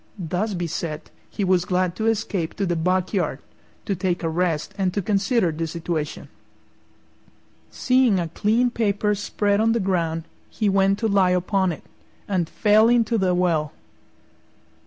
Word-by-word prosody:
Thus 185 +4 -2
beset, 165 -2 -4 0.2
he 205 - -3
was 185 -2 +2
glad 180 -1 0
to 220 - -1
escape 205 -6 -1
to 200 - -1
the 175 -2 0
back 185 +3 0
yard 170 -9 0 0.5
to 200 - -1
take 180 -1 -2
a 165 - 0
rest 165 0 -1
and 190 -2 0
to 200 - +1
consider 200 -1 +1
the 165 +1 -3
situation. 160 -2 -4 1.4
Seeing 255 -6 +2
a 170 - -2
clean 225 +8 +1
paper 210 -2 0
spread 205 0 0
on 225 +1 +3
the 235 - +1
ground, 170 -4 -1 0.3
he 215 -2 -1
went 195 0 +3
to 225 - 0
lie 195 -3 +3
upon 190 0 0
it, 160 - -8 0.4
and 180 -5 -1
fell 215 +1 +4
into 235 -1 +2
the 185 -2 +1
well. 165 -4 0
190 Hz, 155 wpm, -23 LUFS, 170-210 Hz, 1.4 s, fell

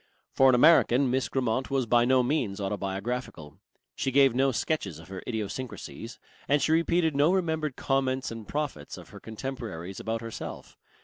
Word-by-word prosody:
For 135 0 +5
an 130 - +5
American 135 -2 +5
Miss 130 +1 0
Grammont 130 -1 -1
was 135 -2 0
by 120 +1 +3
no 130 0 +4
means 120 -7 -1
autobiographical. 100 - -4 0.3
She 135 - -2
gave 135 -1 +5
no 135 +2 +2
sketches 110 - -2
of 80 +2 -14
her 95 -1 -7
idiosyncrasies, 115 +1 -5 0.3
and 145 +2 +3
she 155 - +1
repeated 165 -1 +2
no 145 +4 +4
remembered 160 -6 -1
comments 135 -2 -1
and 115 -2 -8
prophets 145 - -4
of - - -12
her - - -11
contemporaries 110 -7 -6
about 115 0 -3
herself. 115 -1 -8
125 Hz, 165 wpm, -28 LUFS, 110-140 Hz, 0.3 s, For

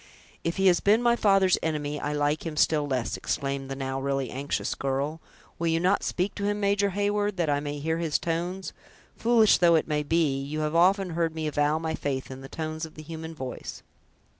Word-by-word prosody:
"If 165 +2 -2
he 195 - +1
has 180 -2 +5
been 215 +4 +3
my 235 0 +4
father's 195 -4 +4
enemy, 150 -2 -2
I 145 - -2
like 145 +1 0
him 160 -2 -5
still 150 -2 +3
less!" 130 -4 -1
exclaimed 135 -1 -3
the 135 - -3
now 135 0 -3
really 135 -1 -1
anxious 140 +2 -2
girl. 140 +4 -2 0.4
"Will 170 - 0
you 165 0 +2
not 185 +4 +2
speak 185 +2 -1
to 205 - -5
him, 205 0 0
Major 200 0 +2
Heyward, 205 +1 0
that 165 -4 +1
I 145 - +2
may 145 0 -4
hear 160 +3 -1
his 160 -3 +1
tones? 175 +3 -3 0.4
Foolish 225 -2 +4
though 170 -1 +5
it 160 - +1
may 150 -1 0
be, 150 -3 +1
you 150 +3 -3
have 150 0 -1
often 185 +2 +3
heard 165 -1 -1
me 160 -1 -3
avow 150 0 +1
my 160 0 -2
faith 135 -4 -3
in 130 0 -8
the 135 - -10
tones 155 0 -4
of 160 - -6
the 155 - -9
human 160 +1 -7
voice!" 130 -4 -7
160 Hz, 215 wpm, -27 LUFS, 145-185 Hz, 0.4 s, has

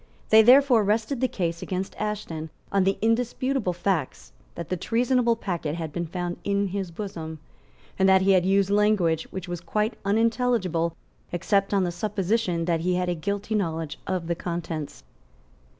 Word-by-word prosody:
They 220 0 +9
therefore 250 -1 +6
rested 220 +5 0
the 260 - +3
case 170 -7 -3
against 190 +1 -3
Ashton 185 -7 -4 0.2
on 195 -1 +2
the 195 0 +2
indisputable 240 0 +1
facts 165 - -2 0.2
that 170 -2 -6
the 185 - 0
treasonable 235 +4 +1
packet 170 -8 -3
had 160 -3 -5
been 175 -1 -3
found 175 +1 -4
in 200 -1 0
his 195 -1 -3
bosom, 165 -4 -6 0.6
and 190 0 +5
that 190 0 +5
he 195 - +4
had 185 -2 +4
used 195 +1 +2
language 200 -6 +2
which 190 -1 -6
was 175 -1 -5
quite 210 +5 -1
unintelligible 205 -6 +1 0.4
except 195 +3 +1
on 200 -2 +2
the 175 - -1
supposition 190 -1 -1
that 170 -1 +1
he 180 +2 0
had 180 0 0
a - - +1
guilty 200 +6 -3
knowledge 165 -6 -2
of 185 -3 -2
the 170 - 0
contents. 170 -3 -5
190 Hz, 165 wpm, -25 LUFS, 170-215 Hz, 0.6 s, They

